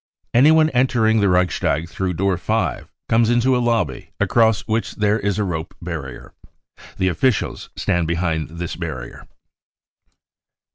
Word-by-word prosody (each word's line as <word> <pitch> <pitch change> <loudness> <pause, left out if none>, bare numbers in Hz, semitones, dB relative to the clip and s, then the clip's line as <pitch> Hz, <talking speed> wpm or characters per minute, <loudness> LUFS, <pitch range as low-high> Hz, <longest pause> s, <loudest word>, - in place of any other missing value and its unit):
Anyone 155 +5 +5
entering 120 -3 +2
the 100 -1 +3
Reichstag 90 -3 +1
through 90 +2 -3
door 95 +2 +1
5 - - -2 0.2
comes 115 0 +3
into 120 +2 +3
a - - +1
lobby 115 - -1
across 110 -3 +3
which 110 +1 -2
there 105 +1 +1
is^a 100 0 -1
rope 80 -1 -4
barrier. 80 -6 -7 0.6
The 95 - +1
officials 105 +7 -1
stand 85 -2 0
behind 80 -2 -1
this 85 0 -4
barrier. 75 -8 -7
95 Hz, 130 wpm, -20 LUFS, 85-115 Hz, 0.6 s, Anyone